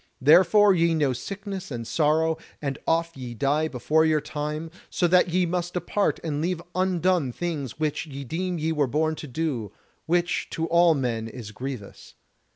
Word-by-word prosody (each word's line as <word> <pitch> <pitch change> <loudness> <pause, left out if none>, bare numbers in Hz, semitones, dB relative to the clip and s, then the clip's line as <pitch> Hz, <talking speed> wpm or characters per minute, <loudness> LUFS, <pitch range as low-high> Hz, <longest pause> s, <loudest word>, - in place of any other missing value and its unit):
Therefore 185 +8 +6
ye 170 -2 +2
know 145 -4 +2
sickness 195 - -6
and 120 -4 -5
sorrow, 160 +3 +1 0.2
and 140 -2 -3
oft 165 0 +1
ye 125 -3 -7
die 145 +6 +1
before 155 +3 +1
your 155 -1 +3
time, 150 +2 -4 0.2
so 175 - +1
that 180 +1 +4
ye 180 +1 +2
must 175 0 -2
depart 185 +3 0
and 150 -3 -2
leave 175 +1 -1
undone 185 -5 +1
things 150 -4 -4
which 155 +1 -1
ye 140 -1 -7
deem 175 +7 -3
ye 160 +1 -1
were 150 -3 +1
born 155 +4 +1
to 150 - -7
do; 130 - -3 0.4
which 175 +1 0
to 165 - -2
all 170 0 +4
men 115 -5 -2
is 115 -2 -8
grievous. 125 -3 -8
160 Hz, 170 wpm, -25 LUFS, 140-175 Hz, 0.4 s, Therefore